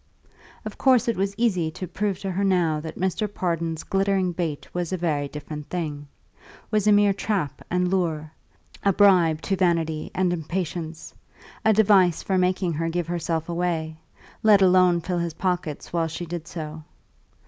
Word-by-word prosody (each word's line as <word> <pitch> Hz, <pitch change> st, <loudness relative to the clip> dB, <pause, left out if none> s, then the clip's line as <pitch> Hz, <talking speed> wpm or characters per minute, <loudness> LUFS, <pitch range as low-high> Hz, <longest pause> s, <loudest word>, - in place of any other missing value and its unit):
Of -, -, -7 dB
course 255 Hz, -2 st, +4 dB
it 235 Hz, -, +1 dB
was 195 Hz, +1 st, -1 dB
easy 185 Hz, -9 st, +1 dB
to 180 Hz, +3 st, -7 dB
prove 195 Hz, +2 st, -2 dB
to 195 Hz, -, -3 dB
her 190 Hz, +2 st, -1 dB
now 175 Hz, -5 st, +2 dB
that 160 Hz, +1 st, -7 dB
Mr. 190 Hz, +3 st, -1 dB
Pardon's 165 Hz, -4 st, -2 dB
glittering 195 Hz, -1 st, +1 dB
bait 165 Hz, -4 st, -3 dB
was 175 Hz, -1 st, -2 dB
a 185 Hz, -, -1 dB
very 150 Hz, -5 st, -1 dB
different 150 Hz, 0 st, -8 dB
thing; 150 Hz, -5 st, -4 dB, 0.6 s
was 215 Hz, -1 st, +1 dB
a -, -, +6 dB
mere 205 Hz, -1 st, +5 dB
trap 195 Hz, -8 st, -2 dB
and 180 Hz, 0 st, +1 dB
lure, 165 Hz, -5 st, -1 dB, 0.5 s
a 200 Hz, -, +4 dB
bribe 175 Hz, -6 st, +4 dB
to 195 Hz, -, 0 dB
vanity 165 Hz, -4 st, 0 dB
and 185 Hz, -1 st, +1 dB
impatience, 165 Hz, -1 st, -4 dB, 0.5 s
a 220 Hz, -, +5 dB
device 195 Hz, -5 st, +4 dB
for 190 Hz, -1 st, +1 dB
making 185 Hz, -1 st, +1 dB
her 165 Hz, +2 st, -1 dB
give 175 Hz, +1 st, -1 dB
herself 165 Hz, -1 st, -2 dB
away 170 Hz, -2 st, -2 dB, 0.4 s
let 210 Hz, -3 st, +6 dB
alone 180 Hz, -2 st, +5 dB
fill 180 Hz, 0 st, -2 dB
his 170 Hz, -2 st, -3 dB
pockets 180 Hz, -6 st, -3 dB
while 165 Hz, -1 st, +1 dB
she 165 Hz, +2 st, -5 dB
did 170 Hz, 0 st, -6 dB
so. 155 Hz, -1 st, -7 dB
175 Hz, 170 wpm, -24 LUFS, 160-190 Hz, 0.6 s, a